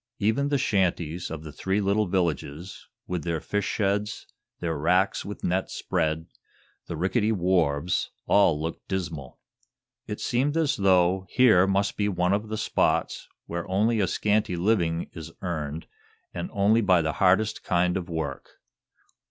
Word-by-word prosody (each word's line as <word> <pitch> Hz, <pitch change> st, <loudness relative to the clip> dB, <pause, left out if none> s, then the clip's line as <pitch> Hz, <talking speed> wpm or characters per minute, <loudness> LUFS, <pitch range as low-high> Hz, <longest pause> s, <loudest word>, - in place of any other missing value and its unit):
Even 110 Hz, +7 st, +1 dB
the 145 Hz, -, +2 dB
shanties 90 Hz, -, 0 dB
of 80 Hz, -1 st, -6 dB
the 75 Hz, -, -8 dB
three 95 Hz, +7 st, -1 dB
little 100 Hz, +1 st, +1 dB
villages, 85 Hz, -1 st, -2 dB, 0.2 s
with 90 Hz, -3 st, -3 dB
their 85 Hz, -1 st, -1 dB
fish 100 Hz, +5 st, -2 dB
sheds, 105 Hz, 0 st, -1 dB, 0.3 s
their 85 Hz, -2 st, -2 dB
racks 90 Hz, +6 st, +1 dB
with 100 Hz, 0 st, -8 dB
nets 90 Hz, +2 st, -1 dB
spread, 80 Hz, +1 st, -1 dB, 0.6 s
the 85 Hz, -, -5 dB
rickety 105 Hz, +6 st, +1 dB
wharves 90 Hz, -4 st, +1 dB, 0.2 s
all 85 Hz, -7 st, +4 dB
looked 80 Hz, +2 st, -5 dB
dismal. 85 Hz, -9 st, -4 dB, 0.7 s
It 105 Hz, -, -5 dB
seemed 140 Hz, +6 st, 0 dB
as 160 Hz, -3 st, +2 dB
though 95 Hz, -1 st, +3 dB
here 110 Hz, -7 st, +5 dB
must 100 Hz, +1 st, 0 dB
be 105 Hz, 0 st, +1 dB
one 90 Hz, 0 st, +1 dB
of 105 Hz, +2 st, -1 dB
the 110 Hz, -, -3 dB
spots 105 Hz, -, 0 dB, 0.2 s
where 85 Hz, +1 st, -5 dB
only 110 Hz, +4 st, +2 dB
a 95 Hz, -, +2 dB
scanty 105 Hz, +1 st, +1 dB
living 85 Hz, -3 st, +1 dB
is 80 Hz, 0 st, -9 dB
earned 80 Hz, -3 st, -3 dB, 0.5 s
and 85 Hz, 0 st, -4 dB
only 105 Hz, +3 st, +3 dB
by 90 Hz, -5 st, +4 dB
the 80 Hz, -1 st, -1 dB
hardest 95 Hz, +3 st, +3 dB
kind 90 Hz, 0 st, +1 dB
of 90 Hz, -1 st, -4 dB
work. 80 Hz, -5 st, -5 dB
95 Hz, 150 wpm, -26 LUFS, 85-105 Hz, 0.7 s, here